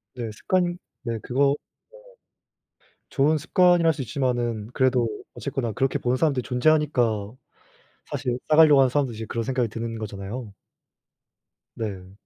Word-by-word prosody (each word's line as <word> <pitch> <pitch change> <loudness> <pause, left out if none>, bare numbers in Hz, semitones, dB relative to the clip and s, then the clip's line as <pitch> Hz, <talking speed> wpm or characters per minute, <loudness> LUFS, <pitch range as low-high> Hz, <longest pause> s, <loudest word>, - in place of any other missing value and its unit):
네. 120 -3 -4
습관 175 - 0 0.3
네 115 -2 -3
그거 140 +2 +2 1.3
네. - - -35 0.2
좋은 150 +3 +2
습관이라 175 +2 +3
할 160 - +5
수 145 - -5
있지만은 120 -3 -1
그래도 130 -3 +2 0.3
어쨌거나 135 -4 -3
그렇게 130 +5 0
보는 125 +1 0
사람들이 140 -4 +1
존재하니까.사실 125 -5 0 0.9
싸가려고 155 -2 +7
하는 135 -1 +5
사람들도 130 -3 0
이제 110 +1 -6
그런 115 - -2
생각이 130 -1 0
드는 115 +1 -5
거잖아요. 105 +2 -6 1.2
네. 95 -4 -5
125 Hz, 325 characters per minute, -24 LUFS, 115-145 Hz, 1.3 s, 싸가려고